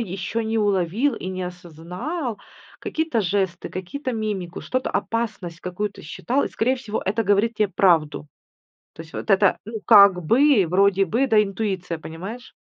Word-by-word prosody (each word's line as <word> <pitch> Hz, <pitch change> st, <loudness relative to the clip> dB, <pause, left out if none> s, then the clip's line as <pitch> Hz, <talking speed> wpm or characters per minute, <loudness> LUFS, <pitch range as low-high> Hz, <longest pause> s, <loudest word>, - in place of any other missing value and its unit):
еще 195 Hz, +2 st, -3 dB
не 220 Hz, +1 st, -1 dB
уловил 205 Hz, +6 st, +1 dB
и 185 Hz, -, -6 dB
не 185 Hz, 0 st, -4 dB
осознал, 180 Hz, -, -6 dB, 0.4 s
какие-то 315 Hz, -7 st, -1 dB
жесты, 190 Hz, -2 st, -1 dB
какие-то 255 Hz, +9 st, -5 dB
мимику, 205 Hz, -6 st, -4 dB
что-то, 255 Hz, 0 st, -2 dB
опасность 205 Hz, -7 st, -3 dB
какую-то 200 Hz, +3 st, -5 dB
считал, 255 Hz, -, -1 dB
и -, -, -3 dB
скорее 255 Hz, +4 st, 0 dB
всего 225 Hz, -4 st, -4 dB
это 210 Hz, +4 st, 0 dB
говорит 205 Hz, +3 st, +2 dB
тебе 210 Hz, -2 st, +2 dB
правду. 165 Hz, -6 st, +2 dB, 0.7 s
То -, -, -9 dB
есть 165 Hz, -, -18 dB
вот -, -, -6 dB
это, 195 Hz, -1 st, +4 dB
ну 220 Hz, 0 st, -6 dB
как 200 Hz, -4 st, +7 dB
бы, 250 Hz, -, +4 dB
вроде 195 Hz, +2 st, +3 dB
бы, 235 Hz, +10 st, +1 dB
да, 220 Hz, -4 st, +5 dB
интуиция, 195 Hz, -4 st, -3 dB
понимаешь? 190 Hz, +11 st, -8 dB
200 Hz, 155 wpm, -23 LUFS, 180-230 Hz, 0.7 s, как